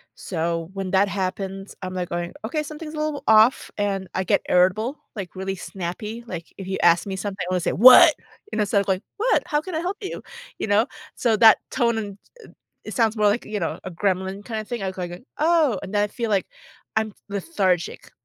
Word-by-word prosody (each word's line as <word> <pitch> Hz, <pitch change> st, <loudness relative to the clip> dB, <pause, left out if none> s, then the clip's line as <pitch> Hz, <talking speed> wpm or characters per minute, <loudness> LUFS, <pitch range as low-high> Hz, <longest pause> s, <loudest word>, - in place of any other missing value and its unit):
So, 165 Hz, -1 st, -3 dB
when 195 Hz, -1 st, -4 dB
that 195 Hz, +1 st, +3 dB
happens, 195 Hz, 0 st, -4 dB
I'm, 185 Hz, -1 st, -5 dB
like, 180 Hz, -1 st, -3 dB
going, 175 Hz, 0 st, -3 dB
"Okay, 300 Hz, +7 st, -2 dB
something's 305 Hz, +1 st, -8 dB
a -, -, -7 dB
little 305 Hz, -1 st, -2 dB
off," 220 Hz, +3 st, +5 dB
and 200 Hz, -2 st, -1 dB
I 190 Hz, -, 0 dB
get -, -, +2 dB
irritable, 200 Hz, +10 st, +2 dB, 0.2 s
like, 195 Hz, -4 st, -6 dB
really 190 Hz, +1 st, -3 dB
snappy, 195 Hz, +6 st, -6 dB
like, 175 Hz, -6 st, -8 dB
if 195 Hz, -, -7 dB
you 190 Hz, -, -2 dB
ask 170 Hz, +2 st, +5 dB
me 190 Hz, -1 st, -4 dB
something, 190 Hz, -1 st, -4 dB
I -, -, -2 dB
wanna 185 Hz, -, +1 dB
say, 175 Hz, -, -1 dB
"What?" 255 Hz, -, +9 dB, 0.4 s
and -, -, +1 dB
instead 200 Hz, -1 st, +2 dB
of 200 Hz, -, -1 dB
going, 190 Hz, 0 st, +1 dB, 0.2 s
"What? 460 Hz, +4 st, +2 dB
How 295 Hz, -, +1 dB
can 360 Hz, +1 st, -6 dB
I -, -, 0 dB
help 365 Hz, +4 st, -3 dB
you?" 385 Hz, -, -6 dB, 0.3 s
You -, -, -3 dB
know? 210 Hz, +3 st, +3 dB, 0.3 s
So, 230 Hz, -2 st, +2 dB
that 220 Hz, 0 st, +8 dB
tone 235 Hz, -1 st, +1 dB
and, 205 Hz, -3 st, -5 dB, 0.2 s
uh, -, -, -13 dB, 0.4 s
it -, -, -7 dB
sounds 225 Hz, -3 st, +2 dB
more 210 Hz, -1 st, +3 dB
like, 210 Hz, +4 st, +2 dB
you 215 Hz, -1 st, -4 dB
know, 165 Hz, -, -2 dB
a 185 Hz, -, -5 dB
gremlin 190 Hz, +2 st, -2 dB
kinda 220 Hz, -2 st, -4 dB
thing 235 Hz, -1 st, -5 dB
act 190 Hz, -1 st, -4 dB
like 175 Hz, -1 st, -4 dB
a 175 Hz, -, -8 dB, 0.2 s
"Oh," 310 Hz, -, +3 dB
and 200 Hz, -, -7 dB
then 205 Hz, -, +3 dB
I -, -, +2 dB
feel 230 Hz, +1 st, -3 dB
like 195 Hz, -3 st, +1 dB, 0.5 s
I'm 220 Hz, -1 st, 0 dB
lethargic. 185 Hz, -2 st, -1 dB
200 Hz, 220 wpm, -23 LUFS, 185-230 Hz, 0.5 s, What